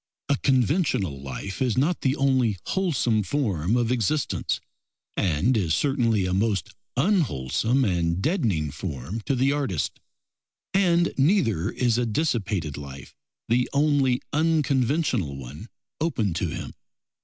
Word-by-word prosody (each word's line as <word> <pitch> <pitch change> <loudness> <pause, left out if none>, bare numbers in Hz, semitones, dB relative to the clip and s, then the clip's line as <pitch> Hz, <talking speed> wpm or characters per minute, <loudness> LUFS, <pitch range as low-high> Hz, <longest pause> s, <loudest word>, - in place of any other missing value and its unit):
A 140 - +3
conventional 125 - +1
life 70 - -6
is 125 -3 +1
not 155 +7 +1
the 135 0 +1
only 130 -7 +2
wholesome 140 - +1
form 105 - 0
of 120 -1 +1
existence, 125 +2 0 0.6
and 95 - +1
is 85 -7 +1
certainly 115 -8 +1
a 90 - -1
most 100 -3 0 0.2
unwholesome 125 - +1
and 85 -3 0
deadening 95 - 0
form 75 - -5
to 135 - +2
the 130 +2 +2
artist; 135 - -2 0.7
and 175 -3 +3
neither 135 - +2
is 120 -1 +1
a 120 - 0
dissipated 105 - -1
life 70 -2 -9 0.3
the 125 +2 +2
only 140 -3 +2
unconventional 145 - +1
one 70 - -9 0.3
open 115 - 0
to 80 - -1
him. - - -6
115 Hz, 125 wpm, -25 LUFS, 90-140 Hz, 0.7 s, A